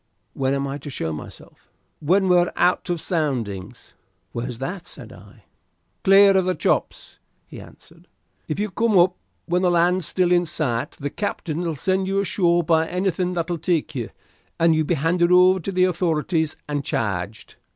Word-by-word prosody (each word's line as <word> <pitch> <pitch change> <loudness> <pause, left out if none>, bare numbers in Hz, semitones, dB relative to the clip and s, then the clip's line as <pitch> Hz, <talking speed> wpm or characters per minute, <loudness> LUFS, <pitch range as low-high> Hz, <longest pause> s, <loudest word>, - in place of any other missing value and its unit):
"When 135 0 0
am 140 0 -1
I 140 +1 -5
to 145 - -8
show 80 - -3
myself?" 75 - -11 0.3
"When 190 +6 +2
we're 180 -1 +3
out 180 +1 +1
of 175 -1 -1
Soundings." 120 - -3 0.4
"Where's 120 0 -5
that?" 175 +8 -6
said - - -10
I. - - -17 0.6
"Clear 195 0 +6
of 190 - +2
the 185 0 0
Chops," - - -2 0.3
he - - -11
answered. - - -17 0.4
"If - - -3
you 210 -1 -2
come 225 +1 +2
up 180 +1 +4 0.3
when 180 +1 0
the 180 - +3
land's 175 0 +2
still 180 -1 +1
in 175 -1 +3
sight 125 -7 -2
the 145 0 -5
captain'll 170 -5 -3
send 190 +5 0
you 195 +1 0
ashore 175 -3 +1
by 160 0 +2
anything 180 0 -1
that'll 170 0 -2
take 165 -1 -1
you, 120 -4 -4 0.5
and 165 0 +4
you'll 155 -1 0
be 175 - +1
handed 170 +4 +1
over 185 +1 +6
to 190 +3 -4
the 185 -1 +2
authorities 165 -3 0
and 145 -1 -2
charged." 105 - -4
170 Hz, 170 wpm, -22 LUFS, 145-185 Hz, 0.6 s, Clear